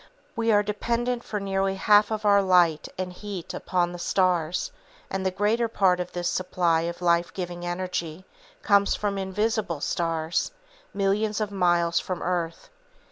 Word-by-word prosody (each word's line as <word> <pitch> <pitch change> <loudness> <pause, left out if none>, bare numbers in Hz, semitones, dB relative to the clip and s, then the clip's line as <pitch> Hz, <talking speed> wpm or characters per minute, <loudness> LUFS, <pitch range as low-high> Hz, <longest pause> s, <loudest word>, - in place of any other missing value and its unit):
We 230 -1 +1
are 205 -1 +4
dependent 235 +4 -1
for 210 - -4
nearly 195 -1 -1
half 205 +1 +4
of 215 -1 -3
our 200 -1 +5
light 175 -5 +3
and 180 -1 -4
heat 195 -2 -7
upon 175 -1 -1
the 175 - -8
stars, 180 -2 0 0.4
and 195 0 -2
the 190 - +2
greater 210 +5 +1
part 190 -5 +2
of 180 0 -4
this 175 -1 -3
supply 175 -3 +1
of 170 +1 -8
life 170 0 +2
giving 175 -1 -5
energy 175 -1 -4 0.4
comes 200 0 +4
from 200 -1 -2
invisible 200 -3 -1
stars, 165 0 -1 0.4
millions 205 +2 0
of 210 -1 -2
miles 175 -3 +2
from 185 - -4
the - - -6
earth. 170 -2 -3
185 Hz, 160 wpm, -26 LUFS, 175-205 Hz, 0.4 s, our